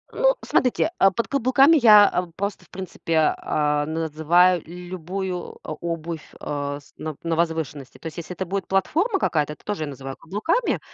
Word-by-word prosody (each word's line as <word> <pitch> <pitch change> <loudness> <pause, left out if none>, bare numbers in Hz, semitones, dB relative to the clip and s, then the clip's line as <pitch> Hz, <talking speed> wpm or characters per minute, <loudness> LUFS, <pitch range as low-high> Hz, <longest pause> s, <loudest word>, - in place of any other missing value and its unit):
Ну, - - +3
смотрите, 260 +6 +2
э, 195 - +7
под 230 +5 -2
каблуками 275 +3 +4
я 205 -5 +6
просто, 200 +1 -4
в - - -28
принципе, 165 -4 0
а, 150 -1 0
называю 165 +3 +3
л 165 - -15 0.2
любую 185 +1 -5
обувь, 165 0 -5 0.2
э, 145 -1 -3
с 145 - -22
на 155 -2 -5
на 165 -1 0
возвышенности. 160 -5 -2
То 165 - -8
есть, 160 - -9
если 175 +1 -6
это 190 - -3
будет 195 +1 -3
платформа 340 - +1
какая-то, 150 - 0
то - - -27
тоже 205 -7 -2
я - - -4
называю 135 -1 -7
каблуками. 215 - -1
170 Hz, 170 wpm, -23 LUFS, 155-200 Hz, 0.2 s, э